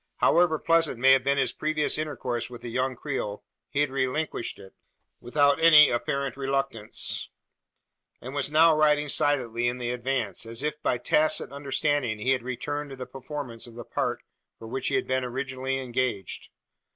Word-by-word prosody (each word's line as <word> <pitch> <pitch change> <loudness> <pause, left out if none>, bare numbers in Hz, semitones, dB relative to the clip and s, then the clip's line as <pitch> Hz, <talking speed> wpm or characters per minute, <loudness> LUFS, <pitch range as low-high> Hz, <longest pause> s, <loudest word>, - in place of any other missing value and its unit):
However 170 -2 +4
pleasant 165 -4 +2
may 135 +3 +5
have 135 -1 +5
been 140 +1 +1
his 130 -3 +1
previous 155 -1 -1
intercourse 130 -6 -3
with 120 -1 -11
the 120 - -6
young 130 +2 -1
Creole, 120 -6 -4 0.3
he 140 - 0
had 145 -2 +1
relinquished 135 0 -2
it, 95 - -14 0.5
without 145 +4 +2
any 155 -3 +8
apparent 135 +2 -2
reluctance; 135 -5 -2 0.9
and 130 +2 -8
was 140 0 0
now 160 +1 +6
riding 150 -1 +3
silently 120 -5 +1
in 120 +1 -1
the 120 -1 -3
advance, 125 -5 -2
as 115 +4 -5
if 150 0 -3
by 125 - +1
tacit 150 +6 +2
understanding 140 -3 -1
he 110 +5 0
had 130 -2 +1
returned 145 +4 -4
to 135 - -8
the 130 -1 -6
performance 130 -2 -6
of 115 - -13
the 120 -1 -8
part - - -2 0.3
for 115 - -10
which 130 +3 -3
he - - +1
had 195 - +1
been 130 0 0
originally 130 +1 -3
engaged. 125 -6 -3
135 Hz, 175 wpm, -26 LUFS, 120-145 Hz, 0.9 s, any